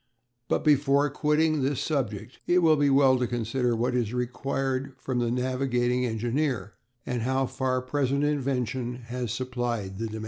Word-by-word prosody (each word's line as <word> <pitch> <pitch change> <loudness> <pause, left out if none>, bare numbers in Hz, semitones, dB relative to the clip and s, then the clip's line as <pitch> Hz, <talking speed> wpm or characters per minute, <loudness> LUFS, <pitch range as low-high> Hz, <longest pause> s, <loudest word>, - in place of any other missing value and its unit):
But - - 0
before 145 -1 +4
quitting 150 +1 +2
this 135 0 0
subject 125 -6 -3
it 180 0 +4
will 160 -1 +6
be 145 -1 +3
well 135 -2 +5
to 125 - 0
consider 120 +1 0
what 120 +2 0
is 120 -2 -1
required 135 +2 -2
from 130 -1 -2
the 120 -1 +1
navigating 125 0 0
engineer, 120 0 -1 0.3
and 125 -2 -2
how 130 +3 +1
far 130 0 -1
present 140 +1 0
invention 130 -4 -1
has 120 -1 -5
supplied 120 -6 -3
the 115 - -2
demand. 110 0 -6
130 Hz, 160 wpm, -27 LUFS, 120-140 Hz, 0.3 s, will